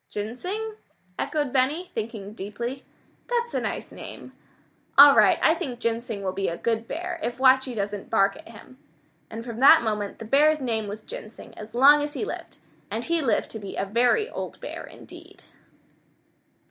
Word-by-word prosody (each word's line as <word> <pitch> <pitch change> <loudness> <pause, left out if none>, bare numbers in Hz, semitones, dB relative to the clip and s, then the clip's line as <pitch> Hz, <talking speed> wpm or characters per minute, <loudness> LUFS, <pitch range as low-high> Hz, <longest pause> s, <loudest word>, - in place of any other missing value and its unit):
'" - - -50
"Ginseng?" 365 - -5 0.4
echoed 290 -4 -1
Benny, 285 +7 0
thinking 215 -2 -5
deeply. 235 +6 -6 0.5
"That's 475 -1 -1
a - - +1
nice - - -4
name. - - -10 0.6
All 285 0 +10
right, - - +5
I 320 - +6
think 300 -8 -5
Ginseng 230 -3 -3
will 190 - -1
be 195 +1 -2
a 170 - -3
good 230 0 -1
bear, 345 +1 -4
if 240 -4 -3
Watchie 260 -1 +4
doesn't 205 -1 -4
bark 195 -3 +3
at - - -13
him." 230 +4 -14 0.5
And 225 +1 -7
from 235 -2 -6
that 280 +2 +8
moment 210 -2 -2
the 225 - -8
bear's 300 +6 +4
name 225 -5 -2
was 210 +2 -7
Ginseng 215 +1 -10
as 215 +2 -10
long 285 +4 +7
as 295 +1 -4
he 425 - -2
lived, - - -7 0.3
and 230 - -3
he 335 +2 0
lived 260 -6 0
to 220 - -7
be 200 -2 -7
a 195 - -1
very 245 - +2
old - - -7
bear - - -7
indeed. - - -14
240 Hz, 180 wpm, -25 LUFS, 215-295 Hz, 0.6 s, All